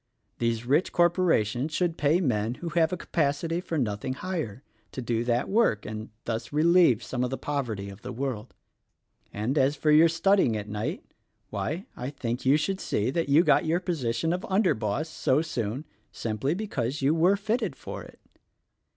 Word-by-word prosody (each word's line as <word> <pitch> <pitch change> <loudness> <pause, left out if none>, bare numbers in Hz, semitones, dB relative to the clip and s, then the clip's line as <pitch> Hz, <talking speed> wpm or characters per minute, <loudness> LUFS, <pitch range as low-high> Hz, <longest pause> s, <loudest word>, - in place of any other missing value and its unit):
These 115 -1 0
rich 145 +8 +2
corporations 165 - +2
should 175 -3 +1
pay 150 +3 +2
men 115 - 0
who 170 +6 -5
have 160 0 +2
a 180 - -2
capacity 165 +2 -1
for 170 -3 -3
nothing 115 0 -1
higher, 140 - -4 0.3
to - - -5
do 115 -2 -1
that 120 0 +1
work, 200 - +2
and 110 0 -6 0.2
thus 115 -1 -3
relieve 155 -6 +4
some 125 -1 -2
of 125 - 0
the 135 - -3
poverty 120 -9 -3
of 100 +1 -10
the 125 - -6
world. 125 -2 -4 0.8
And 115 +8 -1
as 135 +2 +3
for 150 +1 +1
your 160 +2 +7
studying 165 - +3
at 105 0 -5
night; 105 +1 -3 0.5
why, 175 +6 -3
I 125 +2 -4
think 125 -3 -4
you 140 +3 +6
should 190 +5 -1
see 110 - -1
that 165 0 -1
you 150 +5 +6
got - - +4
your 165 +2 +2
position 165 -3 -1
of 180 - -3
under 195 0 +3
boss 110 +8 -2
so 150 -1 +1
soon, 125 -2 -3 0.3
simply 115 +7 -2
because 140 - -3
you 140 +3 +4
were 175 +4 +4
fitted 220 +4 -1
for - - -7
it." - - -14
140 Hz, 180 wpm, -27 LUFS, 115-170 Hz, 0.8 s, your